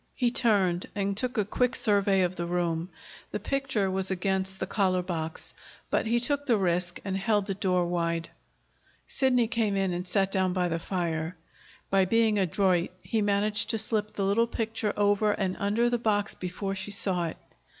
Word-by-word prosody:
He 245 -2 +1
turned 195 -8 +2
and 200 -1 -1
took 250 +4 -3
a 210 - +2
quick 250 +4 0
survey 200 -3 +3
of 180 0 -1
the 170 -1 -3
room. 170 -1 -1 0.4
The - - -3
picture 270 -8 -1
was 190 0 -1
against 190 0 -1
the - - -1
collar 185 -3 +1
box. 165 -3 -4 0.4
But - - +1
he 235 +2 +2
took 285 +3 -1
the 235 -4 +4
risk 175 -2 0
and 195 -1 -2
held 205 +1 +1
the 195 - -2
door 185 -2 +1
wide. 170 -1 -1 0.7
Sidney 250 -3 +2
came 220 -3 0
in 190 -2 +1
and 180 +1 -4
sat 195 +1 +1
down 185 -2 +1
by 180 -1 +1
the 165 0 -1
fire. 165 -2 -2 0.5
By 195 -1 +4
being 220 +1 +3
adroit 185 -1 +2
he 225 - 0
managed 205 +1 +1
to 225 - +1
slip 215 -1 -1
the 195 - -1
little 220 +4 +3
picture 225 -2 -2
over 205 +1 +3
and 190 -2 -1
under 210 +4 +2
the 240 0 +1
box 205 -3 +1
before 185 +2 -4
she 190 +1 -3
saw 185 -4 0
it. 160 - -6
195 Hz, 185 wpm, -28 LUFS, 180-215 Hz, 0.7 s, the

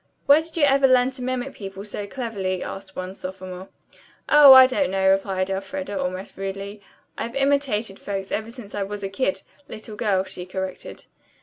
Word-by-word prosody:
"Where 285 +3 +6
did 330 +1 -10
you 315 - +2
ever 275 -1 +5
learn 255 0 +4
to 260 -1 -9
mimic 255 +1 -3
people 195 0 -8
so 205 -1 -5
cleverly?" 200 -6 -3
asked 195 0 -8
one 185 0 -5
sophomore. 185 0 -8 0.6
"Oh, 295 -2 +9
I 260 0 +10
don't 270 +3 0
know," 190 0 +1
replied 195 0 +1
Elfreda 205 +4 -4
almost 185 +1 -5
rudely. 195 +1 -6 0.4
"I've 235 +2 -4
imitated 275 -7 0
folks 195 -1 -5
ever 220 +1 -2
since 230 -4 -11
I 205 - -3
was 200 +1 -5
a 195 - -2
kid 195 -2 -1 0.2
little 215 0 -9
girl," 200 -4 +1
she 185 -1 -8
corrected. 190 0 -6
200 Hz, 180 wpm, -23 LUFS, 190-255 Hz, 0.6 s, I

